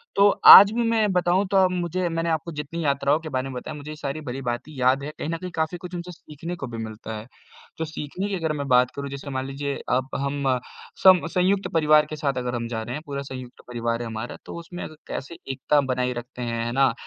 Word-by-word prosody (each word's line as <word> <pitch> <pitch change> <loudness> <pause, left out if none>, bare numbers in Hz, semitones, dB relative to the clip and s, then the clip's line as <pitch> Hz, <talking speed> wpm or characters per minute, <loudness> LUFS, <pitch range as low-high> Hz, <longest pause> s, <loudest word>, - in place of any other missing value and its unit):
तो 200 +1 +6 0.2
आज 200 +1 +12
भी 240 +1 +1
मैं 220 -3 +2
बताऊँ 180 +2 +2
तो 195 - +4
अ, 190 -1 +6
मुझे 180 0 -1
मैंने 165 0 -1
आपको 160 +1 -1
जितनी 150 +2 -5
यात्राओं 140 +1 +2
के 160 - -7
बारे 130 -1 -2
में - - -7
बताया, 125 - -6
मुझे 150 +1 -8
ये - - -6
सारी 150 0 -4
भली-भाँति 130 +1 -4
याद 130 +2 +3
है। 150 - -5
कहीं - - -3
न 165 - -1
कहीं 180 +2 -7
काफ़ी 160 +2 -1
कुछ 180 +1 -8
उनसे 175 +1 -6
सीखने 165 +1 -8
को 140 - -6
भी 115 -1 -7
मिलता 110 0 -7
है, 105 +2 -9 0.5
तो 160 - -2
सीखने 155 +5 -5
की 200 - -1
अगर 160 -4 -1
मैं 140 -1 -3
बात 125 -1 +4
करूँ 140 0 -4
जैसे 140 +1 -7
मान 130 0 -2
लीजिए 140 +1 -3 0.2
अब 130 0 -2
हम 140 0 -2 0.6
सम 185 -3 +7
संयुक्त 190 +2 +2
परिवार 155 -2 +5
के 155 - -4
साथ 140 -3 -1
अगर 125 -1 -2
हम 115 -1 -3
जा 115 -1 -3
रहे 120 +3 -5
हैं, 150 - -5
पूरा 140 -2 -4
संयुक्त 130 -2 -9
परिवार 115 -1 -2
है 120 - -4
हमारा, 110 +1 -6
तो - - -8
उसमें 175 +1 -8
अग 155 - -8
कैसे 155 +5 -6
एकता 140 +3 +2
बनाए 125 0 -1
रखते 125 +1 -8
हैं, 115 -1 -2
है 120 - -2
ना? 135 +2 +4
अ, 125 - 0
145 Hz, 250 wpm, -24 LUFS, 125-170 Hz, 0.6 s, आज